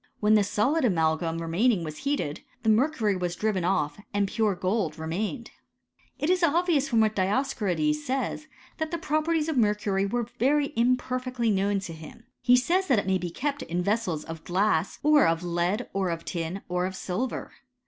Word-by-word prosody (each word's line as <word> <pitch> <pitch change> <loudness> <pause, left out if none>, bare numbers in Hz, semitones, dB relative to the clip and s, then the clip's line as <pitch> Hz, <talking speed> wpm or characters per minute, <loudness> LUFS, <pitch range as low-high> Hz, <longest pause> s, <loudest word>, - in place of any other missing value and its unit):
When 210 0 +3
the 210 -1 +5
solid 260 +10 +1
amalgam 165 -5 +1
remaining 175 +5 +1
was 155 -1 -6
heated, 275 - -2 0.2
the 220 - +2
mercury 220 -2 +2
was 180 -1 -2
driven 210 -3 0
off 160 -3 0 0.2
and 200 -1 +2
pure 210 -1 0
gold 185 -3 -1
remained. 195 - -4 0.7
It 295 - -1
is 365 +1 +2
obvious 330 -2 +2
from 230 -2 +3
what 215 -1 +2
Dioscorides 265 - 0
says, 270 +3 -2 0.3
that 315 0 -1
the 340 - -2
properties 310 0 0
of 315 -4 -1
mercury 210 -3 +1
were 240 +3 -1
very 285 +3 +2
imperfectly 250 0 0
known 200 0 +1
to 170 -3 -6
him. 160 +8 -12 0.2
He 250 0 +5
says 360 +9 +1
that 260 - +3
it 200 - 0
may 190 -1 +1
be 175 0 -3
kept 280 - -3
in 180 -6 -2
vessels 200 -6 -1
of 165 -1 -8
glass, 185 -1 +1
or 300 -1 +5
of 165 +1 0
lead, 175 +6 -1
or 195 -2 0
of 165 -1 -4
tin, 170 +3 -4
or 180 +1 0
of 190 - -6
silver. 215 +8 -3
210 Hz, 180 wpm, -27 LUFS, 180-265 Hz, 0.7 s, the